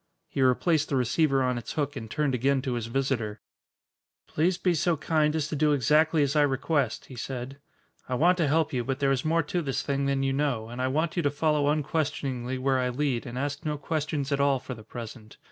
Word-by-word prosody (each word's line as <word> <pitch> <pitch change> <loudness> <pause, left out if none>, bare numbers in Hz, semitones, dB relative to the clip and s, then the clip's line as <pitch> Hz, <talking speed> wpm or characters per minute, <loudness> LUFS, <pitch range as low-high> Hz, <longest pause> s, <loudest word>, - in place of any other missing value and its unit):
He 135 - -3
replaced 150 +5 +2
the 140 - 0
receiver 135 +2 +2
on 125 -1 0
its 120 - -7
hook 145 -1 -2
and 110 -5 -6
turned 145 +2 0
again 130 +2 +1
to 130 - -1
his 120 -2 -3
visitor. 115 -4 -1 0.9
"Please 175 +4 +1
be 180 -1 +1
so 170 +1 +1
kind 150 0 +1
as 155 -2 0
to - - -3
do 150 0 +3
exactly 150 +4 +3
as 140 +1 0
I 150 - +5
request," 140 -2 0
he 130 - -11
said. 130 +2 -6 0.5
"I 130 - 0
want 180 +7 +3
to 160 - +3
help 155 +1 +1
you, 125 -2 0
but 135 +1 -2
there 140 -1 +1
is 130 -2 0
more 165 +1 +2
to 175 +4 -2
this 135 -4 -2
thing 140 -1 -1
than 135 -1 +1
you 135 0 +1
know 135 -6 -1
and 120 +2 -5
I 130 - +1
want 160 +6 -1
you - - +3
to 145 - +2
follow 145 0 +1
unquestioningly 140 -4 -1
where 130 0 +1
I 125 0 0
lead 125 -2 -1
and 125 +1 -6
ask 145 +2 -3
no 150 -1 -2
questions 150 -1 -2
at 140 - +1
all 140 -1 +3
for 130 0 -7
the 110 - -10
present. 115 -1 -9
140 Hz, 230 wpm, -27 LUFS, 130-150 Hz, 0.9 s, I